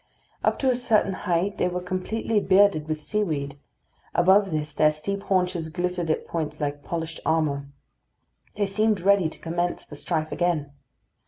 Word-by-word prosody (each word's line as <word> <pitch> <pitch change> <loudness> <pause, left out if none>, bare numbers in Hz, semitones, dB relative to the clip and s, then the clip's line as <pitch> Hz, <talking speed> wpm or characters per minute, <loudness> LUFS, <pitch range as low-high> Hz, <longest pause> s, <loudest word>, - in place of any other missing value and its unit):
Up - - +2
to 265 - +1
a - - +1
certain 225 -5 +2
height 185 +1 -1
they - - +3
were 180 0 -2
completely 185 +5 -1
bearded 195 -5 +4
with 155 -1 -3
seaweed; 145 -10 -2 0.6
above 190 +3 +5
this 150 -2 -2
their 155 +1 +4
steep 155 +7 -3
haunches 180 -4 0
glittered 175 +1 -2
at 155 - 0
points 155 -2 -4
like 145 -1 -3
polished 165 -1 -4
armour. 150 -3 0 0.9
They 205 - +1
seemed 210 0 +1
ready 195 -3 +4
to - - -13
commence 175 +1 -2
the 145 - -11
strife 155 +1 -2
again. 165 -5 0
175 Hz, 160 wpm, -25 LUFS, 155-195 Hz, 0.9 s, above